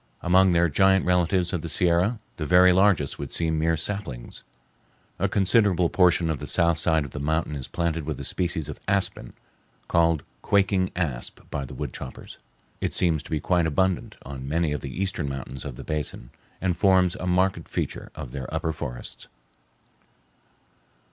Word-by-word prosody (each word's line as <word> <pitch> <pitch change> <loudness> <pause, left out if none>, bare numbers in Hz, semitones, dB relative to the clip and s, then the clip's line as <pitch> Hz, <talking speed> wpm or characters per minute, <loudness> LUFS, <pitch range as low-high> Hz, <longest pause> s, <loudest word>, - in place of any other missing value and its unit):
Among 95 +1 +5
their 85 0 +4
giant 95 +4 +3
relatives 90 0 +2
of 90 - -1
the 85 - -5
Sierra 90 +8 +2 0.2
the 75 - -3
very 90 +3 +6
largest 95 -7 +2
would - - -5
seem 80 -2 0
mere 80 +1 +1
saplings. 85 -9 -4 0.8
A - - +1
considerable 95 -3 +3
portion 90 -3 +3
of 75 - -3
the - - -6
south 85 -2 +3
side 80 -2 +2
of 70 - -9
the 75 - -6
mountain 75 +1 -1
is 65 -2 -5
planted 85 -2 -2
with 75 +1 -4
a - - -5
species 85 -4 -2
of 75 - -7
aspen, 95 -10 -1 0.6
called 85 -2 +2 0.2
"quaking 95 -2 +2
asp" 75 -9 -3
by 70 -2 -3
the - - -10
wood - - -5
choppers. 65 - -9 0.4
It - - -2
seems 80 -4 +2
to - - -14
be 80 - -1
quite 85 +1 +1
abundant 95 +4 0
on 65 0 -7
many 80 0 +1
of 75 - -2
the 70 - -5
eastern 90 -1 -2
mountains 65 0 -6
of 70 -4 -6
the - - -9
basin, 75 -5 -4 0.3
and 90 -2 0
forms 95 -2 +4
a 90 - -4
marked 90 +1 +1
feature - - -4
of - - -7
their 65 -2 -6
upper 80 - -1
forests. 65 -5 -7
85 Hz, 175 wpm, -25 LUFS, 75-90 Hz, 0.8 s, very